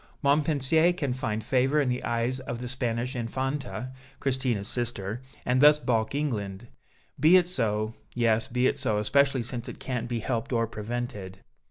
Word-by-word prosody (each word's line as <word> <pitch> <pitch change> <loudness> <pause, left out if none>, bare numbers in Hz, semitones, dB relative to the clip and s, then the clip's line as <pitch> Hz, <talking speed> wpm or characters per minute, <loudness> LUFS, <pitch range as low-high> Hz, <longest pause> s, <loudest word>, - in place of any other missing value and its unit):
Montpensier 150 +3 +3
can 140 -7 -2
find 110 -4 -2
favor 135 +3 +2
in 145 - +2
the 125 0 -1
eyes 120 +2 -1
of 120 -2 -5
the 125 - -5
Spanish 120 0 -2
Infanta, 130 +1 -3 0.3
Christina's 130 -6 0
sister, 115 -2 -2 0.2
and 125 +1 +2
thus 150 0 +8
balk 115 -4 0
England; 110 -7 -3 0.5
be 160 +6 +7
it 175 -1 +3
so, 110 -9 -1 0.2
yes, 115 0 +2
be 125 0 0
it 140 - +1
so, 120 -6 +1
especially 135 +4 +2
since 120 0 -4
it - - -9
can't 120 -3 -3
be 120 - -1
helped 115 +1 -2
or 115 -2 +2
prevented." 105 -4 -5
125 Hz, 165 wpm, -27 LUFS, 115-135 Hz, 0.5 s, thus